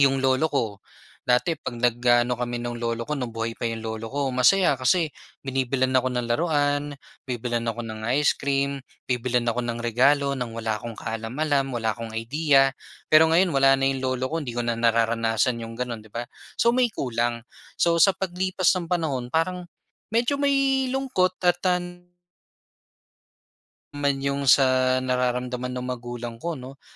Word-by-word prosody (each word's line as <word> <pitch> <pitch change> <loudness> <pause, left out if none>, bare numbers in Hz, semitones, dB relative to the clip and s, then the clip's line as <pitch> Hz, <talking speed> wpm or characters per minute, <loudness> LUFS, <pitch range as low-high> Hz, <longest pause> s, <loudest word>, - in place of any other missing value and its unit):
'Yong 135 -1 +4
lolo 130 +4 +3
ko 140 -6 0 0.6
dati 125 +7 +2
'pag 120 - -6
nag-aano 120 0 +3
kami 120 -1 -3
no'ng 120 0 -4
lolo 115 0 -2
ko 150 +5 -3
no'ng 120 -3 -5
buhay 115 0 -4
pa - - -2
'yong 115 -1 -4
lolo 110 0 -5
ko 140 -2 0
masaya 135 +5 +3
kasi 155 +5 +2 0.3
binibilhan 130 -1 0
ako 130 - +2
ng 125 - 0
laruan. 145 +2 0 0.3
Bibilhan 120 -2 -2
ako 115 +1 -2
ng 110 -1 -6
ice 145 +1 +2
cream. 140 0 0 0.3
Bibilhan 125 0 +1
ako 115 - -4
ng 120 0 -3
regalo 140 +4 +2
nang 120 -2 -4
wala 110 -1 -2
akong 115 0 -7
kaalam-alam. 135 +7 -1
Wala 110 -2 -1
akong 115 -1 -7
idea. 135 +4 +3 0.4
Pero 155 +1 +7
ngayon 180 +2 +4
wala 135 -2 +5
na 135 0 +2
'yong 135 -1 -3
lolo 130 0 -1
ko 165 - -1
'di 130 -7 -5
ko 120 - -1
na 115 -1 -2
nararanasan 115 +1 +1
'yong 115 0 -7
gano'n 120 -1 -4
'di 105 - -22
ba? 120 - -2 0.3
So, 235 - +3
may 250 +1 +3
kulang, 120 -2 -1 0.3
so 170 0 +2
sa 195 +2 +5
paglipas 185 0 0
ng 170 - -5
panahon 160 -8 -1
parang 180 +2 -1 0.5
medyo 240 +5 +2
may 275 -2 +2
lungkot 220 -9 0
at 175 -1 +3
tan 175 -1 -2 1.9
Man 145 -1 0
'yong 140 0 -1
sa 130 -1 +4
nararamdaman 125 0 -1
ng 125 - -4
magulang 120 -1 -5
ko 170 -2 -3
'no, 130 +2 -11
130 Hz, 165 wpm, -24 LUFS, 120-155 Hz, 1.9 s, Pero